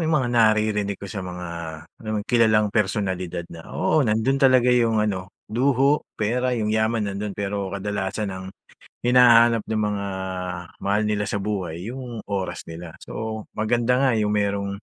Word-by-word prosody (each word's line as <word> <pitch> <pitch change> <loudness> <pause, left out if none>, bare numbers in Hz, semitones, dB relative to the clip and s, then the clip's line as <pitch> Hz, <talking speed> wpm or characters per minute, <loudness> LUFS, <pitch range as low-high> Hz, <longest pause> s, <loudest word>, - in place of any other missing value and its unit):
yung 160 -1 +2
mga 125 -4 0
naririnig 110 -3 +2
ko - - -10
sa 100 0 -5
mga, 90 -1 -6 0.5
alam 110 -1 -4
mo - - +1
kilalang 110 -3 +3
personalidad 95 -5 -1
na, 80 -1 -11
oo 155 - +1
nandun 130 +2 +1
talaga 130 -2 +5
yung 115 -2 +3
ano, 100 -3 0 0.2
luho, 135 +4 +2
pera, 125 +3 0
yung 105 -1 0
yaman 110 -2 +1
nandun, 100 0 -4
pero 100 -1 -2
kadalasan 100 +1 -3
ang 95 0 -7 0.5
hinahanap 120 -2 +6
ng 110 -1 -1
mga 100 -1 -2 0.8
mahal 100 +2 +2
nila 105 -1 0
sa 100 0 -2
buhay 95 -3 -3
yung 125 -2 -6
oras 100 -2 -2
nila. 85 0 -8
So 110 -1 -6
maganda 120 +3 +2
nga 135 - +4
yung 105 -2 +1
merong 100 -1 0
105 Hz, 160 wpm, -23 LUFS, 100-120 Hz, 0.8 s, hinahanap